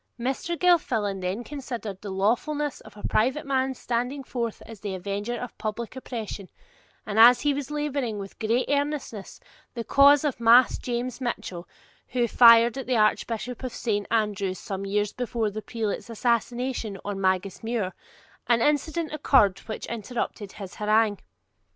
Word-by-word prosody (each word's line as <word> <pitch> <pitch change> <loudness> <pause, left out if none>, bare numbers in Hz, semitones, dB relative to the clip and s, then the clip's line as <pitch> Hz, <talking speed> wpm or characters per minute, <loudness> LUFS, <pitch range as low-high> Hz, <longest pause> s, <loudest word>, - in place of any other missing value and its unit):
Mr. 270 +7 -2
Gilfillan 240 - +2
then 185 +6 -2
considered 240 -8 -6
the 205 - -6
lawfulness 250 +10 0
of - - -15
a 205 - -4
private 260 +7 +1
man's 265 -1 0
standing 250 +4 -2
forth 235 -3 -4
as 225 -3 -11
the 200 -2 -4
avenger 200 +5 -3
of 245 - -7
public 220 +3 -4
oppression, 220 -6 -6 0.6
and 215 +1 -1
as 240 +2 +8
he 290 -1 +2
was 280 -1 -4
labouring 285 -7 -2
with 195 -1 -8
great 230 +3 +1
earnestness 285 -7 -2 0.4
the 235 - -3
cause 280 +3 +6
of 290 -5 -1
Mas 235 +2 +6
James 245 +1 -3
Mitchell, 185 -8 -4 0.4
who 245 -1 0
fired 235 +2 +7
at 260 - -6
the 255 -2 +2
Archbishop 230 +2 0
of 255 - -4
Saint 205 -4 -1
Andrews 205 -4 0
some 195 -3 -5
years 205 +1 0
before 235 -3 -2
the 215 +2 -5
prelate's 225 0 -4
assassination 235 -1 -1
on 200 -1 -3
Magus 190 0 0
Muir, 225 -5 -2 0.5
an 235 -1 +4
incident 300 +4 0
occurred 260 -10 +3
which 220 - -5
interrupted 225 -3 -4
his 195 -3 -8
harangue. 215 -1 +2
235 Hz, 155 wpm, -26 LUFS, 205-260 Hz, 0.6 s, as